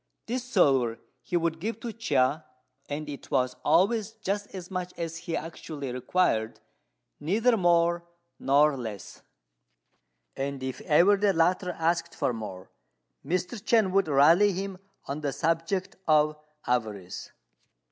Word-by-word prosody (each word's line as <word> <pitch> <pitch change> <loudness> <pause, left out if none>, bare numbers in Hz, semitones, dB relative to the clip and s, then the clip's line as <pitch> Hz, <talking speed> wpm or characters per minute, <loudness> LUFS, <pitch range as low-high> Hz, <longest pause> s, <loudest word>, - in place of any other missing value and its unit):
This 245 +2 -2
silver 135 - +2 0.2
he 175 - -1
would 165 -1 -1
give 220 +5 -3
to 235 -2 -5
Chia, 155 - +1 0.5
and 150 +1 -4
it 145 -2 -8
was 130 -2 +1
always 200 +7 +2
just 205 -2 -3
as 185 -2 -9
much 180 -1 -4
as 165 -1 -4
he 165 0 -3
actually 150 -4 -6
required, 125 -3 0 0.6
neither 225 +9 +2
more 170 -2 +2 0.3
nor 145 +2 +4
less; 110 -6 -7 1.1
and 135 -1 -4
if 130 -1 -4
ever 180 +6 +5
the 200 0 +2
latter 180 +2 +2
asked 170 +1 -1
for 125 - 0
more, 105 -5 -7 0.5
Mr. 180 - -2
Chên 220 -3 +3
would 195 -2 +2
rally 165 +8 +5
him 190 0 -4 0.3
on 140 +2 -4
the 145 -2 -1
subject 165 +5 -1
of 155 -1 +4 0.3
avarice. 105 -7 -2
165 Hz, 135 wpm, -27 LUFS, 140-190 Hz, 1.1 s, ever